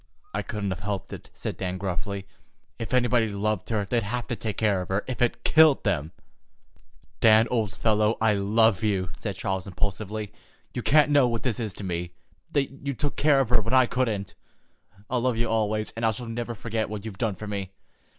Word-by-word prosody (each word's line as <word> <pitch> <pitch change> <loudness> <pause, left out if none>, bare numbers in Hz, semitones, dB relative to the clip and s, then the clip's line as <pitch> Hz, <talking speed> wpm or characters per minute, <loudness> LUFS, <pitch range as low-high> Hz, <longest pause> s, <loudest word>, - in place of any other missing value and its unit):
"I - - 0
couldn't 105 -3 -3
have 90 - -4
helped 100 0 -4
it," - - -9
said - - -4
Dan 95 -1 -3
gruffly. 95 +1 -3 0.5
"If 115 - -4
anybody 120 -3 +3
loved 105 0 -2
her, 105 -3 0
they'd 120 +4 +1
have 120 +3 -3
to 120 - -1
take 110 -2 -4
care 105 -4 +2
of 90 - -7
her, 95 +2 0
if 130 -2 -4
it 120 - +1
killed 155 -7 +5
'em." 80 -5 0 1.1
"Dan, 110 0 +6
old 110 -6 0
fellow, 110 0 +2
I 110 -1 +4
love 105 0 +3
you," 95 -4 0
said - - -4
Charles 95 0 -3
impulsively. 105 +2 -3 0.4
"You 125 - -2
can't 150 +3 +4
know 140 -3 +5
what 115 -1 -2
this 125 -4 -1
is 110 -3 -2
to - - -7
me, 85 -1 -3 0.4
that 140 -2 +1
you 140 -1 -2
took 145 0 -1
care 145 -2 +4
of 125 - -1
her 120 -2 +4
when 115 +5 0
I 130 -1 +7
couldn't. 115 -6 -1 0.7
I'll 125 -1 0
love 125 -2 +1
you 115 0 +1
always, 110 -1 0
and 115 - -6
I 110 - +4
shall 110 +3 -3
never 120 +1 -4
forget 110 0 -2
what 105 -1 -6
you've 105 -4 -7
done 110 -5 0
for 105 - -8
me. 100 -2 -4
110 Hz, 210 wpm, -26 LUFS, 100-120 Hz, 1.1 s, I